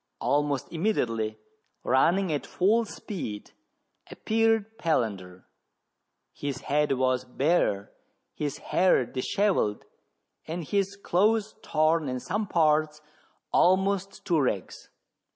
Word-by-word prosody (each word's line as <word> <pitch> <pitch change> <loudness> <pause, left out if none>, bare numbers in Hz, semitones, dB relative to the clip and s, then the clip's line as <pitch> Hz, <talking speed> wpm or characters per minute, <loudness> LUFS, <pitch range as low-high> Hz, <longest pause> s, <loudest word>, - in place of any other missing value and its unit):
Almost 145 -1 0
immediately, 115 - -1 0.5
running 175 +6 +2
at 145 - -3
full 220 +5 +2
speed, 165 - -7 0.6
appeared 225 0 0
Palander. 100 - -1 0.9
His 140 -3 -5
head 150 0 +1
was 130 -1 0
Sare, 135 - +1 0.4
his 145 -2 -3
hair 180 -8 +2
dishevelled, 130 - 0 0.6
and 165 +2 -4
his 200 +4 -1
clothes 210 +3 +1
torn 155 -1 +1
in 130 0 -3
some 210 - -3
parts 155 -2 +2 0.5
almost 195 +1 +2
to 165 -5 +2
rags. 105 -8 -3
155 Hz, 100 wpm, -27 LUFS, 130-195 Hz, 0.9 s, running